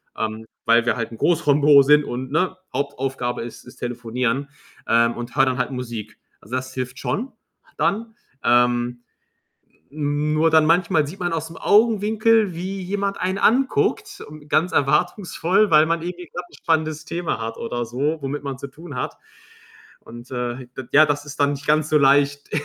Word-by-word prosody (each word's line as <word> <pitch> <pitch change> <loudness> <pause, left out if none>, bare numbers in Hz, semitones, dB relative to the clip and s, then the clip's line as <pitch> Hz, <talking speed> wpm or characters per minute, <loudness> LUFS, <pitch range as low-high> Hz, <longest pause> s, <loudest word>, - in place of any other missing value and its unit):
ähm, 110 0 -4 0.2
weil 115 0 +4
wir 120 - +2
halt 115 -1 -4
'n 115 - -9
Großraumbüro 145 -3 +5
sind 150 +2 +5
und, 130 +2 -5
ne, 185 +4 0
Hauptaufgabe 135 -3 -3
ist 120 0 -8
ist 125 - -14
Telefonieren, 125 +3 -2 0.4
ähm, 115 0 +3
und 120 0 -7
höre 135 - +5
dann 130 -1 0
halt 125 +2 -1
Musik. 115 -4 -6 0.2
Also, 120 +6 -6
das 130 0 -4
hilft 125 0 -5
schon, 255 +6 -3 0.4
dann. 225 +2 -1 0.3
Ähm, 120 0 +2 0.9
n 150 0 -1
nur 160 +1 +3
dann 160 -1 +5
manchmal 165 -2 +3
sieht 185 +6 -10
man 175 -1 -1
aus'm 160 0 -4
Augenwinkel, 220 -1 +3
wie 190 +3 -5
jemand 200 +1 -2
einen 185 +2 -1
anguckt, 270 - +1
ähm, 150 0 -13
ganz 175 +3 +1
erwartungsvoll, 180 +6 +1
weil 155 0 +6
man 165 0 -1
irgendwie 175 -1 -6
grad 175 - -4
'n - - -19
spannendes 155 -2 -1
Thema 170 -9 -3
hat 115 0 -4
oder 120 0 -3
so, 145 +7 -1
womit 140 +2 -4
man 135 -2 -5
zu 140 - -6
tun 150 -1 -11
hat. - - -4 0.8
Und, 120 +2 -12
äh, 125 +1 -4
d 130 - -4
ja, 155 +1 +7
das 145 0 -1
ist 145 - -9
dann 145 0 +3
nicht 140 +1 -7
ganz 155 0 +2
so 155 - +2
leicht, 140 +1 +3
145 Hz, 175 wpm, -22 LUFS, 125-175 Hz, 0.9 s, ja